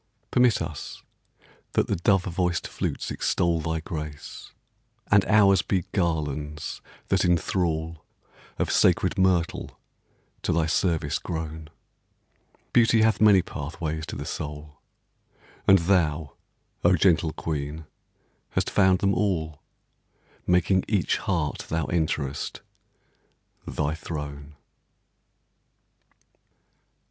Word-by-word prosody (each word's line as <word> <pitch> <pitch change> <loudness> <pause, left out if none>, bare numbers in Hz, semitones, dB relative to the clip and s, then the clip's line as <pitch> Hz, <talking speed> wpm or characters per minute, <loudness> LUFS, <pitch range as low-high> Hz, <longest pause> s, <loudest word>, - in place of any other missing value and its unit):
Permit 125 -3 +3
us - - -7 0.7
that - - +2
the - - -1
dove 95 +2 +2
voiced 90 -2 -1
flutes - - -3
extol 85 -1 +1
Thy 80 0 -2
grace, 75 -2 -7 0.6
and 100 -2 +6
ours 100 -3 +5
be 95 -1 -1
garlands 75 -4 -2 0.3
that 95 -1 +2
enthrall 85 -2 0 0.5
Of - - -1
sacred 100 - +3
myrtle 90 -3 +1 0.6
to - - -1
thy 80 -1 +2
service 80 -3 0
grown. 80 -2 -5 1.0
Beauty 115 -1 +5
hath 110 -1 +2
many 100 -4 +6
pathways 80 +2 -5
to - - -6
the 70 - -5
soul, 75 -1 -6 0.9
And 95 - +8
thou, 85 -5 +1 0.5
O 90 +1 +5
gentle 80 -2 +3
queen, 75 0 -4 0.7
hast - - 0
found 95 -2 +4
them 100 0 +2
all, 80 -8 -1 0.9
Making 90 +1 +3
each 100 -5 +1
heart 85 -6 -2
thou 80 -1 0
enterest 75 -4 -2 1.1
thy 75 0 -1
throne. 75 -2 -7
85 Hz, 100 wpm, -26 LUFS, 75-95 Hz, 1.1 s, And